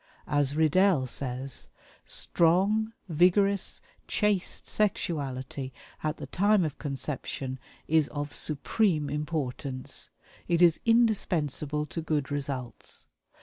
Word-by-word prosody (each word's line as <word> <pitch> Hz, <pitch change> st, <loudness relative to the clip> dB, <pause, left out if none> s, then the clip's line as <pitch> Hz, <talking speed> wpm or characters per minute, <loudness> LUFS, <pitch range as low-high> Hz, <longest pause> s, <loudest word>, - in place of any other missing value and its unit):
As 145 Hz, -1 st, +1 dB
Riddell 160 Hz, -1 st, +4 dB
says: 130 Hz, +1 st, -4 dB, 0.4 s
"Strong, 195 Hz, +6 st, +2 dB, 0.2 s
vigorous, 185 Hz, +4 st, +3 dB, 0.3 s
chaste 210 Hz, -3 st, +1 dB
sexuality 140 Hz, -, -1 dB, 0.3 s
at 155 Hz, 0 st, -1 dB
the -, -, -6 dB
time 200 Hz, -1 st, +3 dB
of 150 Hz, -, -5 dB
conception 135 Hz, -2 st, -4 dB, 0.3 s
is 155 Hz, -2 st, +3 dB
of 145 Hz, 0 st, -5 dB
supreme 155 Hz, 0 st, +1 dB
importance; 145 Hz, -3 st, -3 dB, 0.4 s
it 170 Hz, -1 st, +2 dB
is 170 Hz, -2 st, +5 dB
indispensable 155 Hz, -, +2 dB
to 165 Hz, -, -5 dB
good 155 Hz, -2 st, -1 dB
results. 135 Hz, -5 st, -5 dB
150 Hz, 100 wpm, -28 LUFS, 140-185 Hz, 0.4 s, is